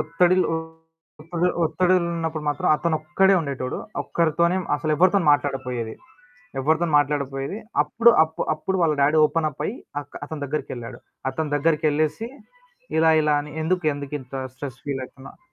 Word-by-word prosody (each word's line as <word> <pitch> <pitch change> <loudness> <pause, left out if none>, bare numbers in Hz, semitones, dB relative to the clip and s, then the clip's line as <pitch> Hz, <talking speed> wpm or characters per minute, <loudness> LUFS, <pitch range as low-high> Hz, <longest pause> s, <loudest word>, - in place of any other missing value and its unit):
ఒత్తిడిలో 175 +4 +2 0.7
ఒత్తిది 175 +2 0 0.2
ఒత్తిడిలున్నప్పుడు 165 -2 0
మాత్రం, 145 - 0
అతనొక్కడే 160 +4 +2
ఉండేటోడు. 135 -4 -4 0.2
ఒక్కరితోనే 170 +2 +1 0.2
అసలెవరితోని 165 +5 +2
మాట్లాడపోయేది. 130 -5 -2 0.7
ఎవ్వరితోను 160 +3 +1
మాట్లాడకపోయేది. 140 +5 -2 0.2
అప్పుడు 230 +11 +4
అప్పు 160 0 -6
అప్పుడు 190 +5 -2
వాళ్ళ 155 -3 +3
డ్యాడీ 150 +3 +4
ఓపెనప్ 155 -1 -1
అయ్యి 235 - -3 0.2
అక్ - - -11
అతని 155 -2 -6
దగ్గరికెళ్ళాడు. 130 -5 -5 0.3
అతని 150 +1 -3
దగ్గరికెళ్ళేసి, 155 +5 +1 0.7
ఇలా 160 0 +5
ఇలా 150 -1 +2
అని? 150 0 -10
ఎందుకు 180 +2 0
ఎందుకు 140 0 -7
ఇంత 130 +1 -18 0.2
స్ట్రెస్ 130 -1 -7
ఫీలయితన్నవు 135 -1 -7
155 Hz, 120 wpm, -23 LUFS, 145-170 Hz, 0.7 s, ఇలా